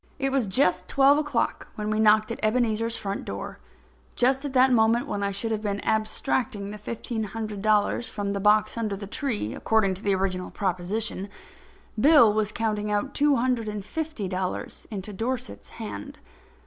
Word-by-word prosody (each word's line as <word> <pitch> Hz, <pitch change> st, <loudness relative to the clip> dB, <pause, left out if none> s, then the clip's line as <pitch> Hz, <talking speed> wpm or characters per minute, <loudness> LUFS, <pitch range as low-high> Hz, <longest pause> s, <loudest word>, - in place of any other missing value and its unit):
It 270 Hz, -1 st, 0 dB
was 265 Hz, -5 st, +1 dB
just 185 Hz, -3 st, +2 dB
twelve 275 Hz, +2 st, +5 dB
o'clock 290 Hz, -6 st, -1 dB
when 210 Hz, 0 st, -3 dB
we 215 Hz, -, 0 dB
knocked 215 Hz, +1 st, +4 dB
at -, -, -5 dB
Ebenezer's 230 Hz, 0 st, +1 dB
front 200 Hz, -1 st, -4 dB
door. -, -, -6 dB, 0.6 s
Just 260 Hz, +3 st, +2 dB
at 285 Hz, -2 st, -4 dB
the 260 Hz, 0 st, +6 dB
moment 230 Hz, -1 st, +3 dB
when 205 Hz, -, -3 dB
I 200 Hz, -, 0 dB
should 200 Hz, +3 st, -2 dB
have 215 Hz, -1 st, -1 dB
been 205 Hz, -1 st, -2 dB
abstracting 215 Hz, -1 st, -1 dB
the 210 Hz, -, -8 dB
fifteen 225 Hz, +1 st, -4 dB
hundred 215 Hz, -1 st, -5 dB
dollars 215 Hz, +2 st, +2 dB
from 200 Hz, -1 st, -3 dB
the 200 Hz, -, -2 dB
box 210 Hz, +3 st, +3 dB
under 215 Hz, -3 st, -1 dB
the 200 Hz, +1 st, -7 dB
tree, 210 Hz, -, -2 dB
according 215 Hz, -4 st, +2 dB
to 185 Hz, -, -9 dB
the 200 Hz, -2 st, +2 dB
original 185 Hz, -1 st, -2 dB
proposition, 195 Hz, +2 st, -2 dB, 0.7 s
Bill 255 Hz, -5 st, +7 dB
was 215 Hz, -1 st, 0 dB
counting 215 Hz, -2 st, -1 dB
out 210 Hz, +6 st, -1 dB
two 290 Hz, -1 st, +3 dB
hundred 245 Hz, -2 st, 0 dB
and 210 Hz, -2 st, -4 dB
fifty 310 Hz, -7 st, -4 dB
dollars 185 Hz, 0 st, -4 dB
into 205 Hz, -1 st, -6 dB
Dorset's 210 Hz, -, -4 dB
hand. 100 Hz, 0 st, -7 dB
215 Hz, 175 wpm, -26 LUFS, 200-235 Hz, 0.7 s, Bill